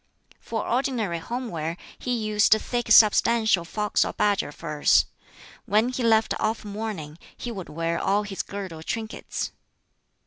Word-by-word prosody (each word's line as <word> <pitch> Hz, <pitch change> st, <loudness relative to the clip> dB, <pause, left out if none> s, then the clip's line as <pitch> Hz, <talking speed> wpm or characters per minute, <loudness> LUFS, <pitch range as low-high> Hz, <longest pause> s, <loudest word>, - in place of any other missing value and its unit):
For 225 Hz, -2 st, -4 dB
ordinary 235 Hz, -8 st, 0 dB
home 240 Hz, +8 st, -4 dB
wear 165 Hz, +1 st, -3 dB, 0.2 s
he 250 Hz, -, -3 dB
used 215 Hz, -1 st, +3 dB
thick 240 Hz, +1 st, -1 dB
substantial 220 Hz, -3 st, +5 dB
fox 210 Hz, +5 st, 0 dB
or -, -, -4 dB
badger 205 Hz, -7 st, +1 dB
furs. 150 Hz, -1 st, +2 dB, 0.6 s
When 215 Hz, +4 st, +3 dB
he 255 Hz, 0 st, -3 dB
left 225 Hz, -1 st, +3 dB
off 220 Hz, 0 st, -1 dB
mourning, 200 Hz, -7 st, -5 dB, 0.2 s
he 240 Hz, -, -5 dB
would 190 Hz, -6 st, -7 dB
wear 165 Hz, +2 st, -2 dB
all 205 Hz, +2 st, +1 dB
his 200 Hz, -2 st, -4 dB
girdle 190 Hz, -5 st, -7 dB
trinkets. 220 Hz, +6 st, -4 dB
210 Hz, 140 wpm, -25 LUFS, 170-225 Hz, 0.6 s, substantial